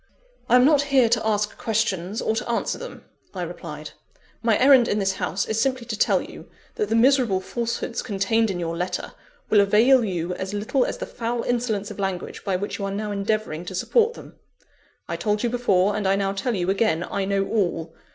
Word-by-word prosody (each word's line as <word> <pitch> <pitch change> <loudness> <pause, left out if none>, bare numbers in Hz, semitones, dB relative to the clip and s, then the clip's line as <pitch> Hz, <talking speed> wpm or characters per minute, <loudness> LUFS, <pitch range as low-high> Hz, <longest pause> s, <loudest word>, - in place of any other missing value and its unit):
"I 240 - +6
am 250 0 +6
not 290 -1 +5
here 265 -4 +5
to 225 -1 +1
ask 210 -1 -1
questions, 210 -3 -1
or 220 - 0
to 235 +2 -3
answer 235 - -1
them," - - -9 0.3
I - - -3
replied - - -7 0.5
"my 225 -2 +3
errand 260 -2 +6
in 205 - 0
this 195 -2 +1
house 185 +1 -1
is 220 0 -1
simply 255 -1 0
to 230 -1 -4
tell - - +2
you, - - -12 0.2
that 210 - -2
the 225 - +1
miserable 240 -5 +4
falsehoods 235 +3 -3
contained 225 +1 0
in 185 -2 -3
your 165 -1 -3
letter, 180 +2 -3 0.4
will 210 - +6
avail 230 +6 +5
you 180 -4 -2
as 190 +2 -5
little 225 +5 +1
as - - -4
the - - -4
foul 235 0 -3
insolence 230 -4 -1
of - - -9
language 190 -2 -4
by 195 -2 -1
which 200 +4 -4
you 200 - -2
are 195 - -3
now 210 +1 -3
endeavouring 205 -4 -2
to 190 - -6
support 460 - +2
them. - - -13 0.7
I - - -3
told 210 0 -1
you 240 - 0
before, 205 -5 +2
and 210 -2 -1
I 195 - +3
now 195 -1 0
tell 235 +4 -2
you 180 0 0
again, 195 -5 +1
I 195 - -3
know 195 0 0
all. 170 -6 -1
210 Hz, 210 wpm, -24 LUFS, 195-235 Hz, 0.7 s, I